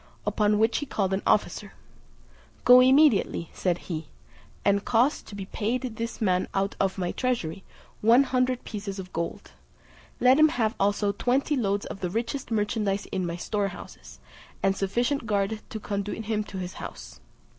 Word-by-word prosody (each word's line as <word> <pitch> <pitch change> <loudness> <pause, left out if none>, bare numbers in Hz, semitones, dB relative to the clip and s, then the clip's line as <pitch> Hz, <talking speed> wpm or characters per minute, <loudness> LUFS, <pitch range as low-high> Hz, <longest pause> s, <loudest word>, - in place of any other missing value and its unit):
Upon 210 0 +2
which 220 +2 +2
he 290 - -5
called 195 -6 -1
an 190 - 0
officer, - - +1 0.9
"Go 250 0 +9
immediately," 255 - +4
said 180 -2 0
he, 160 -3 -5 0.6
"and 200 0 +3
cause 245 +6 +2
to 205 - -11
be 195 -1 -5
paid 230 +6 -2
to 255 - -3
this 230 +1 -5
man 185 -4 +1
out 195 +1 0
of 195 0 0
my 180 -2 -1
treasury, 200 -8 -2 0.4
one 235 +5 +6
hundred 255 -1 0
pieces 200 -2 -6
of 185 -1 -8
gold: 170 0 -4 0.7
let 255 +3 +5
him 310 0 +7
have 225 -7 0
also 205 +1 +2
twenty 260 +8 0
loads 205 -5 0
of - - -7
the 180 - -2
richest 235 +7 -3
merchandize 210 -2 0
in 185 -2 -1
my 170 - -3
storehouses, 195 0 -5 0.5
and 195 - +3
a - - -12
sufficient 240 +6 0
guard 205 0 0
to 220 - -5
conduit 205 +1 -4
him 215 -1 -1
to 195 - -8
his 180 -1 -5
house." - - -9
210 Hz, 170 wpm, -26 LUFS, 195-240 Hz, 0.9 s, Go